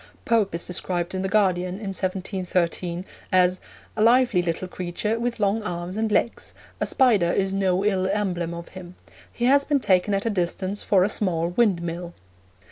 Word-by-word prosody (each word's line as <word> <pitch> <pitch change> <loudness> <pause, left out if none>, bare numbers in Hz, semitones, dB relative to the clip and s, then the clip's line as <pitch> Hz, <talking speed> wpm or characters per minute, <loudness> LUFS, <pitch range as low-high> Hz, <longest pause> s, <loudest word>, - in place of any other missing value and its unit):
Pope 225 - +2
is 170 - -2
described 175 0 -2
in 185 - -2
the 190 - -2
Guardian, 185 -3 +1
in 200 -1 -5
1713, 185 -2 -2 0.3
as 180 -1 +3 0.4
'a 215 - -2
lively 235 -4 +4
little 175 +1 -3
creature, 185 +5 -3
with 235 0 -2
long 205 +2 +1
arms 175 -2 -5
and 220 0 -1
legs: 230 - -1 0.2
a - - 0
spider 215 -10 +3
is 195 +1 0
no 190 0 +1
ill 190 -3 +1
emblem 185 -4 -1
of 170 0 -8
him. 185 -1 -11 0.4
He 240 - -2
has 280 +2 +5
been 285 0 +1
taken 195 -2 +2
at 195 - -2
a 230 - +1
distance 185 +1 -2
for 190 -3 +3
a - - +3
small 175 -5 0
windmill.' 175 -4 -1
190 Hz, 175 wpm, -24 LUFS, 175-210 Hz, 0.4 s, has